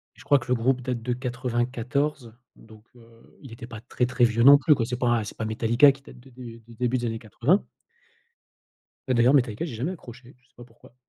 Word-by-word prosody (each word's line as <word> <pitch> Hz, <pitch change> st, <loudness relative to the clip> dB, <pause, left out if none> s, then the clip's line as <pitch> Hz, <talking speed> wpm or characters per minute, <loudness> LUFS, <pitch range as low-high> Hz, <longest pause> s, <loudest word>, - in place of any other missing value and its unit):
Je -, -, -16 dB
crois 145 Hz, -, +3 dB
que 120 Hz, -, -12 dB
le 125 Hz, -, +1 dB
groupe 125 Hz, +2 st, 0 dB
date 125 Hz, -1 st, -4 dB
de 125 Hz, +2 st, -2 dB
94 125 Hz, +1 st, -3 dB, 0.2 s
donc 110 Hz, -1 st, -17 dB
heu, 115 Hz, 0 st, -21 dB
il 130 Hz, -4 st, -12 dB
était 115 Hz, 0 st, -10 dB
pas 115 Hz, -3 st, -9 dB
très, 125 Hz, +1 st, -2 dB
très 125 Hz, -1 st, +2 dB
vieux 115 Hz, 0 st, +1 dB
non 140 Hz, +2 st, +9 dB
plus, 150 Hz, +2 st, +3 dB
quoi, 115 Hz, -4 st, -1 dB
c'est 125 Hz, 0 st, -4 dB
pas 125 Hz, -, 0 dB
un 120 Hz, -2 st, +1 dB
c'est 105 Hz, -, -10 dB
pas 110 Hz, -, -3 dB
Metallica 115 Hz, +5 st, +4 dB
qui 135 Hz, -, -18 dB
date 130 Hz, -2 st, -15 dB
de 135 Hz, -, -18 dB
de 120 Hz, -2 st, -11 dB
du 115 Hz, 0 st, -17 dB
début 125 Hz, +2 st, -1 dB
des 120 Hz, -, -4 dB
années 115 Hz, -1 st, -3 dB
80. 125 Hz, -, 0 dB, 1.5 s
Bah, 130 Hz, -, +1 dB
d'ailleurs, 120 Hz, +4 st, +4 dB
Metallica 120 Hz, 0 st, +1 dB
j'ai 150 Hz, -9 st, -6 dB
jamais 135 Hz, +11 st, -3 dB
accroché, 125 Hz, -6 st, -13 dB
je 125 Hz, -, -34 dB
sais -, -, -39 dB
pas 120 Hz, -, -12 dB
pourquoi 120 Hz, 0 st, -21 dB
120 Hz, 240 wpm, -25 LUFS, 115-130 Hz, 1.5 s, non